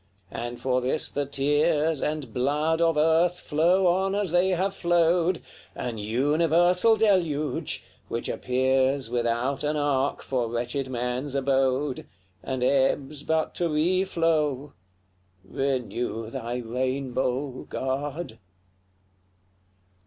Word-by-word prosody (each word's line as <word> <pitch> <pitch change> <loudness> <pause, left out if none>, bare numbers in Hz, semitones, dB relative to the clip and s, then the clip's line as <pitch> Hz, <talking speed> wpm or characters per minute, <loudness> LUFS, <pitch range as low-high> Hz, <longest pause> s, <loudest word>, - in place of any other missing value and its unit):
and 120 +1 -5
for 130 -1 0
this 130 +5 -2
the 145 -1 -2
tears 145 +2 +1
And 150 -7 -3
blood 150 +6 +1
of 165 -2 +3
earth 165 +3 +3
flow 175 +5 +2
on 190 +2 +2
as 200 -4 0
they 175 +2 +3
have 190 +2 0
flowed, 175 -1 +2 0.3
An 120 -3 -4
universal 165 - +3
deluge, 170 -9 0 0.2
which 115 - -3
appears 130 0 +1
Without 120 +3 -1
an 150 +1 0
ark 140 -2 0
for 125 -3 -1
wretched 120 +3 -2
man's 125 +3 -3
abode, 135 0 0 0.3
And 130 -2 -3
ebbs 140 +2 +1
but 160 +1 0
to 175 -1 -1
reflow! 160 -4 +1 0.7
Renew 120 -2 -2
thy 120 -2 -4
rainbow, 130 +2 -2
God! 135 -1 -4
140 Hz, 110 wpm, -26 LUFS, 130-165 Hz, 0.7 s, of